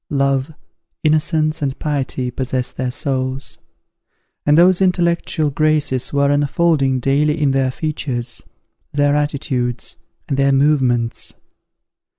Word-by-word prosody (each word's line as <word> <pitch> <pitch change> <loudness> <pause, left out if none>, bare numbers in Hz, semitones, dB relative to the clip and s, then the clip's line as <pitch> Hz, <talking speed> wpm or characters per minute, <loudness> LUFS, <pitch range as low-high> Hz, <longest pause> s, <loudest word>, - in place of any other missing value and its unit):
Love, 140 0 0 0.5
innocence, 155 0 +1
and 135 -1 -2
piety, 135 -4 -2
possessed 130 0 -3
their 130 0 -2
souls; 130 +1 -3 0.9
and 150 +1 +5
those 180 +2 +5
intellectual 170 -4 +1
graces 150 -3 0
were 140 0 +2
unfolding 145 -2 +2
daily 150 +4 +1
in 145 -2 +2
their 135 -1 +1
features, 130 -5 -4 0.5
their 145 0 +2
attitudes, 130 -4 -2 0.3
and 135 - -1
their 140 0 +3
movements. 135 -4 +1
140 Hz, 110 wpm, -19 LUFS, 130-155 Hz, 0.9 s, and